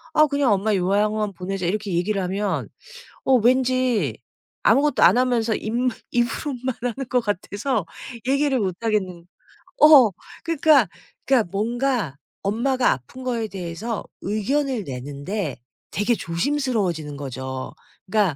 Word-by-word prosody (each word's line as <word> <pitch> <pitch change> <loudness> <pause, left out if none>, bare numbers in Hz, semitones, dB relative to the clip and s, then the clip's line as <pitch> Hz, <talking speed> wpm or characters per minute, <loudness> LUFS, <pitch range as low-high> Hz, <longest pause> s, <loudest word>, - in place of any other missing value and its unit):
"아 305 - +7
그냥 280 -4 +1
엄마 205 +2 +2
요양원 205 +2 +1
보내자." 185 0 -3
이렇게 205 +1 -2
얘기를 190 +3 0
하면 195 +2 -2 0.6
어 265 - +2
왠지 250 - +2 0.5
아무것도 280 +6 +3
안 - - +7
하면서 235 -3 +1
입므 240 +3 -1 0.2
입으로만 250 +1 -1
하는 250 +1 -3
것 250 - +3
같아서 205 +2 -2 0.4
얘기를 275 -1 +2
못하겠는 190 -3 -2 0.6
어 290 -7 +9 0.3
그러니까 315 -2 +4 0.4
그러니까 250 -7 +3
뭔가 235 - -1 0.3
엄마가 245 +5 +1
아픈 135 - -6
거에 235 -3 -1
대해서 195 +4 -4 0.2
의견을 230 +3 -1
내는 140 +2 -7
데 195 -7 -2 0.3
되게 210 +4 +1
조심스러워지는 185 - -1
거죠. 130 -1 -6 0.3
그러니까 200 -6 +2
215 Hz, 300 characters per minute, -23 LUFS, 185-255 Hz, 0.6 s, 어